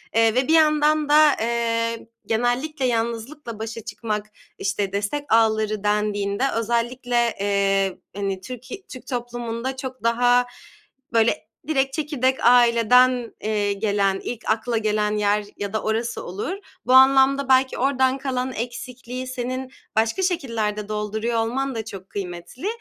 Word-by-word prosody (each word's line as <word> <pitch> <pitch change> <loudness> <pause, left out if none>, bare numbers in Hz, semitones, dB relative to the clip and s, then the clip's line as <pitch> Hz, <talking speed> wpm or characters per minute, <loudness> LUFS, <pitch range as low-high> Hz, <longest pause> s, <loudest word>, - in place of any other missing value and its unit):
eee, 225 0 +4
ve 255 +2 +2
bir 320 - +3
yandan 305 -1 +4
da, 300 -1 +6
eee, 230 0 -1 0.2
genellikle 245 +5 0
yalnızlıkla 235 +1 -3
başa 225 +1 -5
çıkmak, 210 -1 -3 0.3
işte, 195 0 -2
destek 205 +9 -2
ağları 215 -2 +2
dendiğinde 205 +1 0
özellikle, 240 +1 0
eee, 195 -1 +1 0.2
hani, 195 -2 -3
Türki 255 - -9
Türk 255 - -11
toplumunda 240 0 -4
çok 260 -2 -7
daha 245 +1 +3 0.7
böyle 225 -2 +2 0.2
direkt 270 -3 +1
çekirdek 270 -5 0
aileden, 245 0 +5
eee, 205 -2 0
gelen, 200 -1 0
ilk 235 -2 -5
akla 225 +1 0
gelen 210 -1 0
yer 205 0 +1
ya 200 0 -4
da 220 - -1
orası 230 +2 -2
olur. 210 - -4 0.3
Bu 255 - +2
anlamda 270 +1 +6
belki 260 0 +4
oradan 265 0 +2
kalan 260 -2 -2
eksikliği 250 +2 -6
senin 255 +1 -4 0.2
başka 225 +11 +1
şekillerde 220 - -1
dolduruyor 215 +2 -1
olman 255 +3 -1
da 220 -1 -4
çok 195 -3 -9
kıymetli. 185 - -6
235 Hz, 130 wpm, -23 LUFS, 215-255 Hz, 0.7 s, da